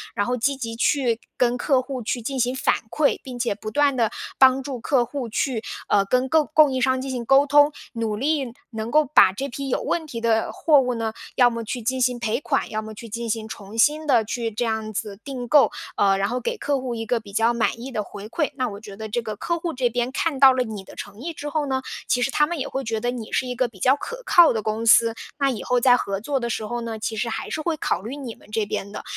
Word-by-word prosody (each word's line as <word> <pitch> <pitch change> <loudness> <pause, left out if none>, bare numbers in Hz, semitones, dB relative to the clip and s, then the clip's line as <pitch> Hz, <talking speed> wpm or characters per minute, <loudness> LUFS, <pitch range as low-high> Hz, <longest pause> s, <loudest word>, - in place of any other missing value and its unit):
然 205 - +1
后 245 - 0
积 275 +4 0
极 230 -3 -5
去 240 -1 +1 0.2
跟 245 0 +2
客 260 0 +2
户 260 -1 -5
去 240 +2 -2
进 265 +4 -3
行 250 +1 +1
反 - - +2 0.2
馈， 300 +3 +1
并 255 -2 -7
且 235 -3 0
不 215 - -6
断 290 0 +3
地 230 -3 +1 0.3
帮 265 0 +6
助 260 -2 -5
客 245 +1 +2
户 255 -1 -5
去， 230 0 -1 0.2
呃， 200 - +3
跟 255 +5 +1
购 315 +1 +4
供 305 -3 +6
应 255 - -1
商 260 0 +2
进 265 0 -4
行 245 -2 -3
沟 270 +3 +5
通， 290 0 +5 0.2
努 225 -2 -2
力 275 +1 0 0.2
能 220 0 -4
够 305 +3 +4
把 250 -9 +6
这 270 +8 -3
批 275 +2 -5
有 - - 0
问 320 -2 -2
题 240 -6 -5
的 225 -1 +1
货 300 -3 +4
物 250 -1 -1
呢， 225 -1 -2 0.2
要 245 -1 +6
么 230 -1 -4
去 240 +2 -4
进 255 +3 -1
行 250 -1 +2
赔 235 0 -1
款， 285 -1 -1
要 215 0 -2
么 220 0 -8
去 230 +2 -10
进 235 +2 -4
行 220 0 -2
重 210 0 -9
新 300 +6 +3
地 240 -6 +4
去 230 +1 -3
这 235 +3 -2
样 220 -1 -2
子 200 -1 -5
订 260 -3 -6
购， 285 +3 +5 0.2
呃， 195 -1 +3
然 195 - +1
后 250 +2 -1
给 475 - -3
客 285 -8 0
户 255 -2 -4
一 225 0 -4
个 240 +1 0
比 205 -2 -13
较 225 +3 +3
满 235 0 0
意 260 +3 -7
的 215 -4 -2
回 205 +1 -9
馈。 295 +5 -1
那 255 -2 -1
我 200 -1 -8
觉 205 -2 -10
得 220 +2 -6
这 240 +3 -1
个 215 -2 -5
客 340 +11 -2
户 335 0 -3
这 250 -2 +1
边 245 +2 -1
看 285 0 -1
到 270 -1 +8
了 255 -1 +1
你 215 -4 -7
的 - - -14
诚 205 +1 -9
意 335 +4 -4
之 295 -1 -6
后 305 -1 -1
呢， 265 -1 -1 0.3
其 250 - +1
实 270 - +1
他 295 0 +3
们 345 +1 -3
也 270 - -2
会 270 - -3
觉 225 -2 -2
得 245 +2 -1
你 235 -3 -7
是 - - 0
一 250 - -4
个 255 0 +1
比 210 -5 -17
较 260 +8 +4
可 485 +11 -7
靠 345 -8 +7
的 220 - -1
公 215 +2 -2
司， 230 0 +6 0.3
那 275 -1 +3
以 235 - -3
后 250 0 +2
在 245 0 +6
合 195 -4 -3
作 270 +6 -1
的 235 -1 -3
时 220 - -2
候 240 +2 -3
呢， 230 -1 -4
其 220 +1 -3
实 225 +2 -1
还 - - -4
是 310 - -3
会 325 -1 -1
考 180 - -1
虑 230 +7 -6
你 260 -6 -7
们 - - -21
这 215 -1 0
边 200 0 -4
的。 - - -7
245 Hz, 295 characters per minute, -23 LUFS, 225-275 Hz, 0.3 s, 到